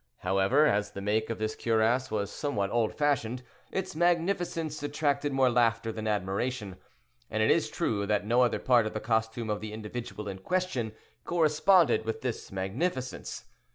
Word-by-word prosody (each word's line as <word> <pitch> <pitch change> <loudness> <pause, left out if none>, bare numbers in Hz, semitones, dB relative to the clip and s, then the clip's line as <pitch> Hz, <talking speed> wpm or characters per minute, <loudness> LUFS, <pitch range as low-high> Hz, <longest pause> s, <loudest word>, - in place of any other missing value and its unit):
However, 95 +10 +3
as 105 -8 +1
the - - -6
make 110 +2 0
of 115 - -2
this 110 0 -2
cuirass 115 +3 +1
was 105 -1 -2
somewhat 100 -10 -2
old 115 -2 +1
fashioned, 130 -5 0 0.3
its 190 -4 -3
magnificence 170 -2 0
attracted 145 0 0
more 135 -2 +3
laughter 115 -1 +2
than 110 0 -5
admiration; 105 +1 -2 0.5
and 110 0 0
it - - +4
is - - +2
true 100 -2 -1
that 105 -1 +1
no 120 +3 +3
other 125 - +3
part 120 -4 +3
of - - -5
the - - 0
costume 110 0 -1
of 105 - -2
the 110 -1 -6
individual 110 0 -6
in 95 -1 -5
question 135 - -1 0.3
corresponded 165 - +3
with 110 0 -3
this 125 -3 -4
magnificence. 125 - -3
115 Hz, 165 wpm, -29 LUFS, 105-145 Hz, 0.5 s, it